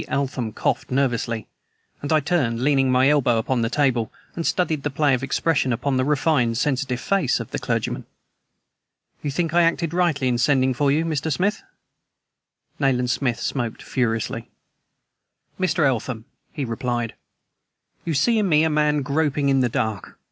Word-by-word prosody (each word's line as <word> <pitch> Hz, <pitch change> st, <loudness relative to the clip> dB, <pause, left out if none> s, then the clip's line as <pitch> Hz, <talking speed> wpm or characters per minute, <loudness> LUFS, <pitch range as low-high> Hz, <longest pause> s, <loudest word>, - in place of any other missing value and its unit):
Eltham 130 Hz, -5 st, -2 dB
coughed -, -, -1 dB
nervously, 120 Hz, -4 st, -1 dB, 0.5 s
and 145 Hz, -, -4 dB
I 155 Hz, -1 st, +4 dB
turned, 135 Hz, -7 st, 0 dB
leaning 135 Hz, -2 st, +3 dB
my 130 Hz, +1 st, +4 dB
elbow 135 Hz, -5 st, +3 dB
upon 120 Hz, +2 st, 0 dB
the 115 Hz, -, 0 dB
table, 125 Hz, -5 st, +1 dB, 0.2 s
and 165 Hz, -, -2 dB
studied 160 Hz, -5 st, 0 dB
the 145 Hz, -, -2 dB
play 145 Hz, 0 st, +2 dB
of 125 Hz, -, 0 dB
expression 140 Hz, 0 st, 0 dB
upon 130 Hz, +3 st, 0 dB
the 130 Hz, -, +2 dB
refined, 135 Hz, -4 st, +1 dB
sensitive 130 Hz, -1 st, -1 dB
face 190 Hz, -3 st, +1 dB
of -, -, -7 dB
the -, -, -3 dB
clergyman. -, -, -2 dB, 1.1 s
"You 145 Hz, -, -3 dB
think 165 Hz, +3 st, -1 dB
I 175 Hz, -, +5 dB
acted 170 Hz, -1 st, +1 dB
rightly 170 Hz, -7 st, +1 dB
in 120 Hz, -1 st, +1 dB
sending 130 Hz, 0 st, +3 dB
for 140 Hz, +2 st, +1 dB
you, 155 Hz, +3 st, +1 dB
Mr. 160 Hz, -1 st, -1 dB
Smith?" 200 Hz, +8 st, 0 dB, 1.2 s
Nayland 125 Hz, -3 st, +1 dB
Smith 120 Hz, -4 st, -1 dB
smoked 120 Hz, -4 st, -3 dB
furiously. 115 Hz, -4 st, -2 dB, 1.1 s
"Mr. 165 Hz, -4 st, +2 dB
Eltham," 120 Hz, -3 st, -1 dB, 0.3 s
he 145 Hz, -4 st, -3 dB
replied, 120 Hz, -1 st, -2 dB, 0.9 s
"you 165 Hz, -2 st, -2 dB
see 225 Hz, -, +3 dB
in 200 Hz, -3 st, +1 dB
me 155 Hz, -1 st, +4 dB
a 160 Hz, -, +2 dB
man 150 Hz, -1 st, +2 dB
groping 145 Hz, 0 st, 0 dB
in 135 Hz, -1 st, +3 dB
the 125 Hz, -2 st, +2 dB
dark. 110 Hz, -4 st, -3 dB
140 Hz, 160 wpm, -23 LUFS, 125-155 Hz, 1.2 s, I